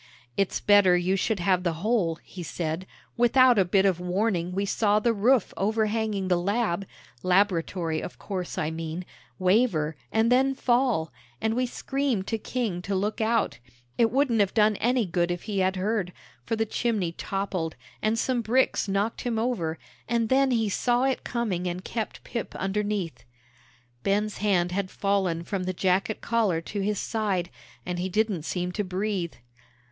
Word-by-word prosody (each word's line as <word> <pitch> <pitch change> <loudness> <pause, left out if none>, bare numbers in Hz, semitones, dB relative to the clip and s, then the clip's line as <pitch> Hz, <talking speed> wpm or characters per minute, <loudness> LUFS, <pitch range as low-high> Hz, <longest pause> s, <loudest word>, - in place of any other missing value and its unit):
"It's 195 - 0
better 200 -3 +5
you 180 +2 +1
should 195 +1 0
have 185 0 +3
the 175 -2 0
whole," 205 -8 +2
he 185 - -9
said; 165 +2 -3 0.3
"without 245 0 +5
a - - +6
bit 190 +2 +3
of 185 -3 +2
warning 180 -1 0
we 195 +2 -1
saw 205 +1 +2
the 230 +2 +2
roof 230 +2 +3
overhanging 215 -1 0
the 180 -1 +3
'Lab' 200 -1 0 0.3
laboratory, 180 -3 +1
of - - -7
course, 185 -3 -5
I 155 0 -1
mean 165 +2 -5 0.3
waver, 185 -5 +2 0.2
and 225 +2 +2
then 265 +2 +4
fall, 240 -11 +1 0.3
and 220 - 0
we 250 +2 0
screamed 265 -5 -1
to 225 +1 -2
King 215 -7 -2
to 200 +2 -2
look 210 +4 -1
out; 220 - +1 0.4
it 230 -1 +3
wouldn't 250 -2 +2
have 200 -2 +2
done 215 -1 +4
any 245 -1 +2
good 175 -1 0
if 175 0 -3
he 205 -3 -2
had 190 0 +2
heard, 190 -1 -1 0.3
for 225 - +1
the 225 0 0
chimney 215 -6 -1
toppled, 185 -2 -3 0.3
and 215 +1 +1
some 245 +1 +1
bricks 240 0 +2
knocked 200 +3 -1
him 240 -3 -1
over, 200 -9 -1 0.3
and 230 -2 +1
then 270 +1 +4
he 230 -3 +2
saw 240 +5 +1
it 265 -1 0
coming 205 -7 -2
and 180 +1 -4
kept 225 -2 -4
Pip 235 - -5
underneath." 200 -3 -2 0.8
Ben's 205 +6 0
hand 185 -4 +2
had 190 0 -1
fallen 190 -5 0
from 185 +1 -3
the 185 - -1
jacket 190 +4 0
collar 220 -8 +1
to 200 +5 -4
his 205 +1 0
side, 195 -6 -1 0.3
and 175 0 -3
he 185 +1 -2
didn't 210 -3 0
seem 180 +3 -2
to 210 +3 -2
breathe. 185 -2 -2
200 Hz, 170 wpm, -26 LUFS, 180-225 Hz, 0.8 s, a